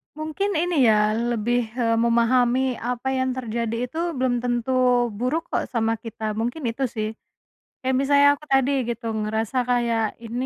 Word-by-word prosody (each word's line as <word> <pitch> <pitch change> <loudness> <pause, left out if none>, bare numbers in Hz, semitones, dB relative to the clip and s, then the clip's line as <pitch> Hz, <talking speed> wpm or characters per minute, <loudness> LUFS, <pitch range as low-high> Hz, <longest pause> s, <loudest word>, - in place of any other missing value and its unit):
Mungkin 315 +6 -2
ini 320 -6 +2
ya 210 -1 +4
lebih, 235 0 -1
eee, 230 -2 +1
memahami 240 +2 +2
apa 250 +2 -2
yang 260 -1 0
terjadi 230 -2 -3
itu 250 +6 -6 0.2
belum 255 -2 0
tentu 240 +1 -1 0.4
buruk 255 +10 -2
kok - - -1
sama 225 -2 -1
kita 225 -1 -5
mungkin 245 +7 -3
itu 270 +4 -4
sih. 215 -1 -1 0.7
Kayak 260 0 0
misalnya 285 +1 +5
aku 305 - -16
tadi 270 0 +3 0.2
gitu 235 0 -5 0.2
ngerasa 220 +3 -2
kayak 235 -2 +1 0.2
ini 240 +3 -3
240 Hz, 155 wpm, -23 LUFS, 230-260 Hz, 0.7 s, misalnya